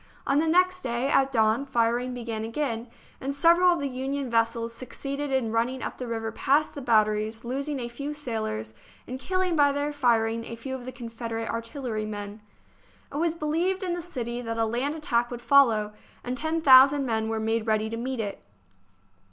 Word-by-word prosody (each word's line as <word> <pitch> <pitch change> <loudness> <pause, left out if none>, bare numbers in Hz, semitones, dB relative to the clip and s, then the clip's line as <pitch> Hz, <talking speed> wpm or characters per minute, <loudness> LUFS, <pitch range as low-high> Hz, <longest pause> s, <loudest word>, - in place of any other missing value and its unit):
On 280 +1 +3
the 320 - +1
next 365 +2 +3
day, 240 0 -1
at 270 -1 +3
dawn, 225 +1 +2
firing 240 -1 0
began 230 -2 -4
again, 230 0 -3 0.3
and 270 - -3
several 340 +4 +5
of 345 - -2
the 280 - -1
Union 265 0 -3
vessels 230 0 +1
succeeded 275 +4 -5
in 260 -4 0
run 230 +1 +2
ning 260 +1 -6
up - - -5
the 250 - -4
river 225 -1 -3
past 285 +6 +1
the 285 - -6
batteries, 215 -1 +1
losing 275 +3 -3
a 240 - -3
few 280 +5 -5
sailors 220 - -4 0.3
and 255 +1 -6
killing 370 +3 0
by 290 -2 +5
their 285 +1 -2
firing 230 -4 +2
a 230 - -6
few 260 +3 -6
of 255 -2 -6
the 255 - -5
Con 240 -2 -8
federate 230 -1 -4
artillerymen. 215 -4 -4 0.7
It - - -3
was 330 +1 +1
believed 340 +5 0
in 360 -2 -1
the 350 - -3
city 245 -8 -4
that 230 -1 -4
a 225 - +2
land 250 +7 -1
attack 240 -6 0
would 245 - -6
follow, 230 -6 +4 0.3
and 250 +1 -3
ten 320 +4 -1
thousand 275 0 +7
men 220 -2 -1
were 225 0 -1
made 225 0 -1
ready 215 0 +1
to 225 - -4
meet 250 +2 -3
it. 205 -3 -4
245 Hz, 195 wpm, -26 LUFS, 230-285 Hz, 0.7 s, thousand